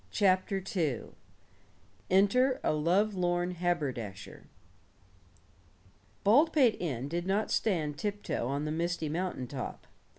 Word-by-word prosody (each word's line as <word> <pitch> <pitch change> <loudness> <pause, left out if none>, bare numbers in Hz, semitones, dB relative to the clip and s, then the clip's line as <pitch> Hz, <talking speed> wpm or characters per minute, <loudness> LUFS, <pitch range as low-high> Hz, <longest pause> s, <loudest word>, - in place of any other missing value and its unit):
CHAPTER 190 -1 +1
II 150 - -1 1.0
ENTER 225 +8 +3
A - - +2
LOVELORN 175 +2 +1
HABERDASHER 140 - -3 1.8
Baldpate 265 - +4
Inn 135 -7 -2
did 170 +4 -3
not 205 +3 0
stand 155 -8 0
tiptoe 205 - -2
on 140 +3 -2
the 150 - -2
misty 165 -1 -1
mountain 170 -5 -2
top. 130 0 -6
175 Hz, 100 wpm, -30 LUFS, 150-200 Hz, 1.8 s, Baldpate